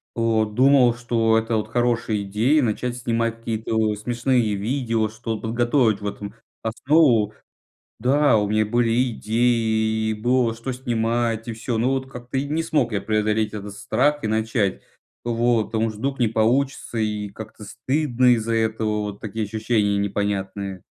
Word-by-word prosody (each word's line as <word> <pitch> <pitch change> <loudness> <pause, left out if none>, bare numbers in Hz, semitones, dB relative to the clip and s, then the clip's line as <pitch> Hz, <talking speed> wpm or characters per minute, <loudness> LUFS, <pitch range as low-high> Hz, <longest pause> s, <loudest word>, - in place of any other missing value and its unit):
вот, 110 -2 +1
думал, 130 -2 +5
что 115 -2 +1
это, 115 0 0
вот, 110 +1 -3
хорошая 120 -3 0
идея- 115 +10 +2
начать 120 +2 -2
снимать 115 -1 -1
какие-то, 110 -1 -1
э, - - -4
смешные 120 0 0
видео, 115 0 -1
что 110 0 -4
т - - -12
подготовить 120 -2 +1
в 105 - -3
этом 100 +1 -6 0.3
основу. 120 -2 +3 0.7
Да, 135 0 +3
у 105 -1 +1
меня 110 0 +2
были 120 +2 +1
идеи, 110 -1 +1
и - - 0
было 120 +1 +1
что 120 +3 -5
снимать, 115 -2 -1
и 115 - -3
всё, 115 +1 -3
но, 125 +4 +1
вот, 130 0 -2
как-то 125 +1 -6
и 140 - 0
не 160 +2 -1
смог 145 -8 0
я 100 - -1
преодолеть 110 0 0
этот 100 -1 -6
страх 145 +7 0
и - - 0
начать. 110 -2 0 0.4
Вот. 120 -1 +1
Потому 110 0 -1
что 110 -1 -9
вдруг 135 +1 -2
не 120 - +3
получится, 120 +3 0
и 105 -2 -1
как-то 110 +1 -10
стыдно 125 +3 0
из-за 115 0 -2
этого, 110 -1 0
вот 105 -1 -6
такие 110 0 -3
ощущения 105 -1 0
непонятные. 100 -1 -2
115 Hz, 165 wpm, -23 LUFS, 110-120 Hz, 0.7 s, думал